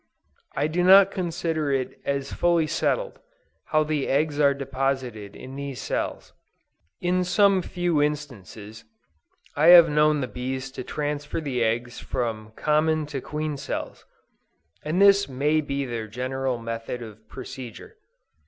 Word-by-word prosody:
I -, -, +1 dB
do 165 Hz, +3 st, 0 dB
not 195 Hz, +1 st, +7 dB
consider 165 Hz, -5 st, -2 dB
it 130 Hz, -2 st, -2 dB
as 140 Hz, 0 st, -2 dB
fully 170 Hz, -2 st, +2 dB
settled, 475 Hz, -, -1 dB, 0.5 s
how 155 Hz, 0 st, +2 dB
the 150 Hz, -2 st, -1 dB
eggs 145 Hz, +1 st, 0 dB
are 140 Hz, -1 st, +4 dB
deposited 130 Hz, -6 st, -3 dB
in 130 Hz, +1 st, -10 dB
these 140 Hz, -2 st, -6 dB
cells. -, -, -4 dB, 0.7 s
In 180 Hz, +1 st, +1 dB
some 190 Hz, +2 st, +3 dB
few 175 Hz, -4 st, 0 dB
instances, 115 Hz, -8 st, -4 dB, 0.7 s
I 150 Hz, +3 st, +3 dB
have 170 Hz, -2 st, +9 dB
known 150 Hz, 0 st, +3 dB
the 130 Hz, -, -2 dB
bees 130 Hz, +2 st, -5 dB
to 130 Hz, -, -7 dB
transfer 150 Hz, +2 st, -3 dB
the 135 Hz, -6 st, -1 dB
eggs 120 Hz, +2 st, -1 dB
from 110 Hz, -3 st, -4 dB
common 155 Hz, +1 st, +1 dB
to 135 Hz, -, -3 dB
queen 150 Hz, 0 st, -4 dB
cells, -, -, -5 dB, 0.8 s
and 155 Hz, +4 st, -1 dB
this 200 Hz, -3 st, +5 dB
may 145 Hz, +4 st, +1 dB
be 140 Hz, -1 st, -3 dB
their 115 Hz, -3 st, -4 dB
general 130 Hz, +3 st, -2 dB
method 115 Hz, +1 st, -5 dB
of 110 Hz, -1 st, -13 dB
procedure. 130 Hz, -, -9 dB
145 Hz, 140 wpm, -25 LUFS, 125-160 Hz, 0.8 s, have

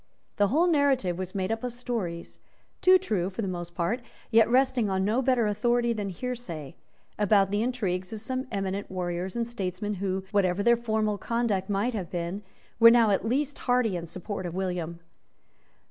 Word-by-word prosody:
The 205 Hz, -, +4 dB
whole 310 Hz, -, +3 dB
narrative 275 Hz, -, +2 dB
was 185 Hz, 0 st, -5 dB
made 190 Hz, +1 st, -1 dB
up 225 Hz, +1 st, -2 dB
of 250 Hz, -1 st, -3 dB
stories, 225 Hz, -9 st, -4 dB, 0.4 s
too 370 Hz, 0 st, +7 dB
true 205 Hz, -, -1 dB
for 210 Hz, +4 st, -4 dB
the -, -, -2 dB
most 175 Hz, -1 st, -5 dB
part, 205 Hz, +9 st, -1 dB, 0.3 s
yet 225 Hz, 0 st, +5 dB
resting 250 Hz, -3 st, +3 dB
on 190 Hz, 0 st, 0 dB
no 225 Hz, +5 st, +2 dB
better 255 Hz, -3 st, +2 dB
authority 235 Hz, +3 st, +1 dB
than 205 Hz, -3 st, -3 dB
hearsay, 185 Hz, -, -6 dB, 0.4 s
about 200 Hz, -2 st, +4 dB
the 205 Hz, +1 st, +1 dB
intrigues 195 Hz, -7 st, -2 dB
of 220 Hz, -, -5 dB
some 255 Hz, +4 st, -3 dB
eminent 195 Hz, -1 st, -3 dB
warriors 180 Hz, 0 st, -3 dB
and 235 Hz, -1 st, -1 dB
statesmen, 205 Hz, -2 st, -3 dB
who, 190 Hz, -1 st, -1 dB
whatever 200 Hz, -2 st, +2 dB
their 235 Hz, +2 st, +5 dB
former 220 Hz, -3 st, -1 dB
conduct 220 Hz, -5 st, -1 dB
might 205 Hz, +5 st, 0 dB
have 190 Hz, -6 st, -4 dB
been, 175 Hz, +3 st, -3 dB, 0.4 s
were 230 Hz, 0 st, +10 dB
now 230 Hz, -2 st, +5 dB
at 195 Hz, +2 st, +1 dB
least 280 Hz, +3 st, -1 dB
hearty 245 Hz, -5 st, +3 dB
in 170 Hz, -1 st, -4 dB
support 185 Hz, +2 st, -5 dB
of 170 Hz, -, -6 dB
William. 180 Hz, -3 st, -3 dB
205 Hz, 180 wpm, -27 LUFS, 185-240 Hz, 0.4 s, were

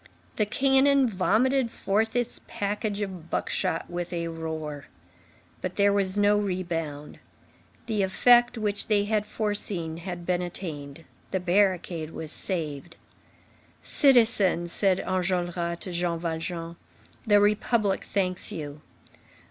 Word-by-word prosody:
The 215 Hz, -, +1 dB
cannon 270 Hz, +3 st, +4 dB
vomited 235 Hz, +6 st, +2 dB
forth 220 Hz, +2 st, -1 dB
its 245 Hz, -1 st, -1 dB
package 205 Hz, +1 st, -2 dB
of 185 Hz, -5 st, -6 dB
buckshot 165 Hz, -, -1 dB
with 175 Hz, 0 st, -5 dB
a 170 Hz, -1 st, -2 dB
roar. 160 Hz, -3 st, -5 dB, 0.8 s
But 185 Hz, 0 st, -4 dB
there 200 Hz, 0 st, +4 dB
was 195 Hz, -1 st, +1 dB
no 205 Hz, 0 st, +4 dB
rebound. 165 Hz, -7 st, -4 dB, 0.7 s
The 220 Hz, -3 st, -1 dB
effect 240 Hz, +5 st, +4 dB
which 210 Hz, -2 st, -1 dB
they 205 Hz, -2 st, +3 dB
had 210 Hz, 0 st, 0 dB
foreseen 205 Hz, -7 st, -2 dB
had 175 Hz, 0 st, -6 dB
been 180 Hz, 0 st, 0 dB
attained. 160 Hz, -4 st, -6 dB, 0.2 s
The 190 Hz, -, -1 dB
barricade 180 Hz, -3 st, +1 dB
was 155 Hz, -1 st, -5 dB
saved. 160 Hz, -4 st, -4 dB, 0.9 s
"Citizen," 225 Hz, -, +4 dB
said 190 Hz, +1 st, +2 dB
Enjolras 175 Hz, -2 st, -1 dB
to 190 Hz, -, -4 dB
Jean 175 Hz, -1 st, -1 dB
Valjean, 165 Hz, 0 st, -4 dB, 0.5 s
"the 205 Hz, -1 st, +6 dB
Republic 210 Hz, 0 st, +2 dB
thanks 185 Hz, 0 st, -1 dB
you." 150 Hz, -5 st, -6 dB
185 Hz, 120 wpm, -26 LUFS, 170-210 Hz, 0.9 s, the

